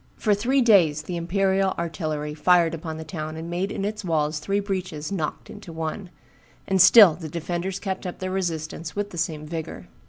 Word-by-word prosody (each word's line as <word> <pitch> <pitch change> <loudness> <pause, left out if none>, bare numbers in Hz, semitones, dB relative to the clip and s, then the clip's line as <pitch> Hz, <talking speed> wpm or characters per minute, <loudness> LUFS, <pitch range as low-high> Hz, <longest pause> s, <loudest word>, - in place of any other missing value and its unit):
For 215 - +2
three 250 +7 +2
days 170 -10 +4
the 175 +3 -5
imperial 190 +2 +1
artillery 155 -3 -3
fired 170 +2 +3
upon 160 -1 -5
the 160 - -6
town 155 -1 -6
and 165 +1 -6
made 185 +3 -2
in 195 - -3
its 210 0 -4
walls 155 -3 0
three 200 +6 -1
breaches 185 -6 -4
"knocked 160 -6 -3
into 170 - -10
one;" 165 +4 -5 0.6
and 190 -1 +3
still 190 -1 +9
the 160 0 -8
defenders 175 +4 -3
kept 190 -2 -4
up 180 - -6
their 185 0 -4
resistance 165 -3 -3
with 205 0 -3
the 175 - -6
same 155 -2 -2
vigor. 160 0 -6
175 Hz, 190 wpm, -24 LUFS, 160-195 Hz, 0.6 s, still